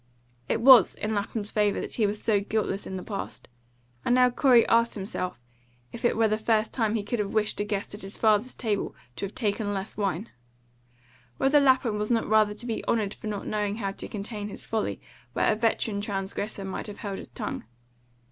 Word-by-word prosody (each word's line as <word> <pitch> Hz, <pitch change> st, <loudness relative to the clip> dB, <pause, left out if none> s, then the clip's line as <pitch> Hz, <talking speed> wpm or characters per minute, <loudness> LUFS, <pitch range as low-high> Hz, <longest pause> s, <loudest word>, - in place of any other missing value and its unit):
It 225 Hz, -, +1 dB
WAS 255 Hz, -1 st, +8 dB
in 215 Hz, +1 st, -3 dB
Lapham's 205 Hz, +1 st, -3 dB
favour 210 Hz, -1 st, +2 dB
that -, -, -5 dB
he 215 Hz, -3 st, +2 dB
was 205 Hz, +1 st, -2 dB
so 210 Hz, -3 st, +2 dB
guiltless 205 Hz, -1 st, -2 dB
in 190 Hz, -, -4 dB
the 180 Hz, -, -6 dB
past, 200 Hz, -3 st, -6 dB, 0.6 s
and 245 Hz, -, +3 dB
now 250 Hz, 0 st, +5 dB
Corey 245 Hz, -2 st, +5 dB
asked 230 Hz, 0 st, +3 dB
himself 185 Hz, -, -4 dB, 0.5 s
if 235 Hz, -, -9 dB
it 240 Hz, -, +2 dB
were 225 Hz, -1 st, +4 dB
the 215 Hz, 0 st, 0 dB
first 220 Hz, 0 st, +1 dB
time 225 Hz, -3 st, +1 dB
he 215 Hz, -, -1 dB
could 230 Hz, +3 st, -2 dB
have 205 Hz, 0 st, -2 dB
wished 215 Hz, -1 st, +1 dB
a -, -, +1 dB
guest 205 Hz, -1 st, -3 dB
at 205 Hz, -, -7 dB
his 195 Hz, +1 st, -5 dB
father's 220 Hz, +3 st, +2 dB
table 215 Hz, -4 st, -2 dB, 0.2 s
to -, -, -2 dB
have 195 Hz, -, -15 dB
taken 205 Hz, -2 st, -1 dB
less 195 Hz, +2 st, -5 dB
wine; 200 Hz, +1 st, -2 dB, 1.1 s
whether 285 Hz, -, +4 dB
Lapham 255 Hz, -6 st, +3 dB
was 210 Hz, -, -1 dB
not 230 Hz, -2 st, +1 dB
rather 215 Hz, -1 st, +3 dB
to 215 Hz, +3 st, -6 dB
be 230 Hz, -2 st, -3 dB
honoured 215 Hz, -3 st, +1 dB
for -, -, -9 dB
not 205 Hz, -2 st, -4 dB
knowing 210 Hz, -1 st, -1 dB
how 200 Hz, -3 st, -2 dB
to -, -, -7 dB
contain 210 Hz, 0 st, -5 dB
his -, -, -6 dB
folly 215 Hz, -, -2 dB, 0.3 s
where -, -, +2 dB
a -, -, +1 dB
veteran 220 Hz, -2 st, 0 dB
transgressor 200 Hz, 0 st, -3 dB
might 190 Hz, +3 st, -4 dB
have 205 Hz, 0 st, -8 dB
held 200 Hz, -3 st, -5 dB
his -, -, -9 dB
tongue. -, -, -5 dB
210 Hz, 210 wpm, -27 LUFS, 200-225 Hz, 1.1 s, WAS